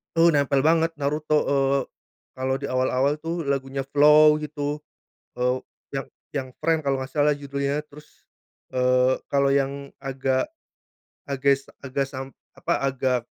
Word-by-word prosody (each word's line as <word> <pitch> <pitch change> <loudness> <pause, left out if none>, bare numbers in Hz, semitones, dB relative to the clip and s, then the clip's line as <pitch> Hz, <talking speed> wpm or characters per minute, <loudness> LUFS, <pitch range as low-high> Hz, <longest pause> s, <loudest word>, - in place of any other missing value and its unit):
Eee, 165 +1 +6
nempel 140 -3 +2
banget 165 +2 +3
Naruto. 150 +1 0
Eee, 140 0 +2 0.6
kalau 130 0 0
di 140 - -3
awal-awal 130 +3 +1
tuh, 165 +2 -3
lagunya 135 0 -1
FLOW 150 +2 +6
gitu. 145 0 -3 0.6
Eee, 125 +1 +1 0.3
yang 135 - -3 0.3
yang 135 -2 -2
Friend 160 0 +1
kalau 135 -1 0
nggak 130 0 -6
salah, 150 0 +4
judulnya. 140 0 -2
Terus, 150 +1 -17 0.5
eee, 125 0 +3 0.2
kalo 140 0 +3
yang 140 0 -1 0.2
agak 135 - -1 0.8
ages 140 0 +1 0.2
agas 135 0 -2
sam 135 0 -6 0.2
apa, - - -1
agak 130 -1 0
140 Hz, 135 wpm, -24 LUFS, 135-150 Hz, 0.8 s, Eee